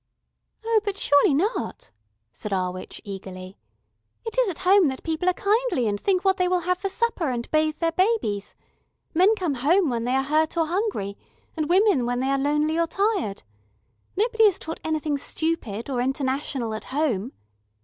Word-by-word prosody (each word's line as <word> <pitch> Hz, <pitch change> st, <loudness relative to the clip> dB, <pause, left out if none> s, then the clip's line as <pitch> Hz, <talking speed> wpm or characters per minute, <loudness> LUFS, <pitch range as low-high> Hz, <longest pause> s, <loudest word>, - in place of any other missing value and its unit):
"Oh, 450 Hz, -1 st, +3 dB
but 405 Hz, -2 st, -3 dB
surely 285 Hz, -4 st, +4 dB
not," 400 Hz, -, -2 dB, 0.4 s
said 210 Hz, -, -7 dB
our 185 Hz, -2 st, 0 dB
witch 185 Hz, 0 st, -8 dB
eagerly. 190 Hz, -2 st, -8 dB, 0.7 s
"It 450 Hz, -, -5 dB
is -, -, +3 dB
at 350 Hz, -, -4 dB
home 380 Hz, -2 st, +6 dB
that 265 Hz, -1 st, -4 dB
people 330 Hz, +2 st, 0 dB
are -, -, +2 dB
kindly 415 Hz, -, +1 dB
and 205 Hz, -1 st, -2 dB
think 380 Hz, -1 st, +1 dB
what 385 Hz, 0 st, +3 dB
they 365 Hz, -, +2 dB
will 360 Hz, 0 st, +1 dB
have 360 Hz, +1 st, 0 dB
for 390 Hz, -, -2 dB
supper, 385 Hz, -, -1 dB
and 240 Hz, -2 st, -3 dB
bathe 310 Hz, 0 st, +2 dB
their 330 Hz, -1 st, 0 dB
babies. 370 Hz, -, 0 dB, 0.6 s
Men 375 Hz, +6 st, +4 dB
come 360 Hz, -8 st, -1 dB
home 300 Hz, +5 st, +2 dB
when 230 Hz, -1 st, -2 dB
they 250 Hz, +1 st, +1 dB
are 270 Hz, -, +2 dB
hurt 310 Hz, +4 st, +1 dB
or 330 Hz, -, +3 dB
hungry, 340 Hz, -, -2 dB, 0.4 s
and 310 Hz, -2 st, -2 dB
women 370 Hz, -, +3 dB
when 245 Hz, 0 st, -1 dB
they 265 Hz, +1 st, 0 dB
are 275 Hz, -, +1 dB
lonely 300 Hz, +3 st, +1 dB
or 335 Hz, -, +2 dB
tired. 390 Hz, -, -1 dB, 0.7 s
Nobody 450 Hz, +1 st, +3 dB
is 400 Hz, -4 st, +4 dB
taught 320 Hz, 0 st, -7 dB
anything 310 Hz, -2 st, -1 dB
stupid 275 Hz, -10 st, -2 dB
or 255 Hz, -3 st, -1 dB
international 265 Hz, -2 st, -2 dB
at 215 Hz, -, -6 dB
home. 260 Hz, -6 st, -1 dB
315 Hz, 180 wpm, -24 LUFS, 250-375 Hz, 0.7 s, home